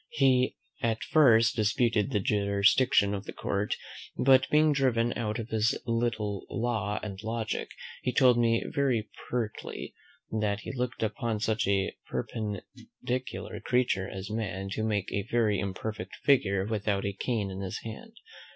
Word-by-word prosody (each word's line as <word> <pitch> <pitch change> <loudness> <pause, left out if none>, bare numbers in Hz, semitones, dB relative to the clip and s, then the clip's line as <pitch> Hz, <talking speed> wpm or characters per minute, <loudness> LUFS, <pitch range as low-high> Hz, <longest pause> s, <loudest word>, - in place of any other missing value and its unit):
He 130 -2 +3 0.3
at 115 -1 0
first 115 -7 +5
disputed 110 -1 +2
the 105 - +1
jurisdiction 100 +2 +3
of 100 0 -4
the - - -7
court; 100 +1 -1 0.4
but, 130 0 +5
being 150 0 +4
driven 120 -4 +2
out 110 -2 -2
of 115 -1 -5
his 110 +1 +1
little 115 -4 -1
law 110 -3 -1
and 100 -2 -6
logic, 110 0 -3 0.3
he 125 - 0
told 125 0 +5
me 115 -1 +3
very 125 -6 0 0.2
pertly, 115 -3 -4 0.4
"that 105 -2 0
he - - -6
looked 125 -2 -2
upon 110 0 -1
such 110 0 0
a 100 -1 +1
perpendicular 110 +4 -5
creature 120 -7 +1
as 95 +2 -6
man 95 -3 -3
to 110 - -2
make 105 -3 -1
a 100 +1 -2
very 110 -4 +2
imperfect 100 0 -4
figure 100 -9 +3
without 105 -2 -1
a 100 - -1
cane 105 -1 -2
in 95 - -6
his 95 -1 -4
hand. 115 - -8
110 Hz, 150 wpm, -29 LUFS, 100-120 Hz, 0.4 s, first